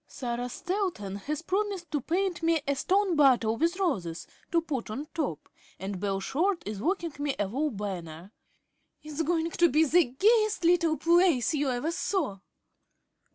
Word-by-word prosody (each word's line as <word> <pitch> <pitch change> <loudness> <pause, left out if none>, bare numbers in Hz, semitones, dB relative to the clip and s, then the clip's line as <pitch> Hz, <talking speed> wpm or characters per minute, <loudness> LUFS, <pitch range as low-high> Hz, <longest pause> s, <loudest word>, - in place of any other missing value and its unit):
Sarah 245 -1 -4
Stanton 355 - -3
has 300 +9 -4
promised 385 -3 -2
to 295 - 0
paint 355 +5 -1
me 330 0 +2
a 280 - +2
stone 380 +5 +1
bottle 250 -7 +4
with 335 +8 0
roses 190 - -2 0.3
to 340 - +4
put 290 -9 -4
on 265 +8 -4
top, 220 - -3 0.3
and 190 0 -4
Bell 195 0 -1
Short 335 - 0
is 210 -2 -4
working 340 - -1
me 290 -1 -1
a 205 - 0
wall 280 +9 -1
banner. 185 - -6 0.7
It's 305 +1 -4
going 330 +1 0
to 345 +1 +3
be 310 +4 +4
the 340 +3 +4
gayest 430 - +2
little 335 -2 +3
place 335 -5 +3
you 290 -2 0
ever 255 +6 -1
saw." 315 - -1
305 Hz, 160 wpm, -28 LUFS, 235-345 Hz, 0.7 s, bottle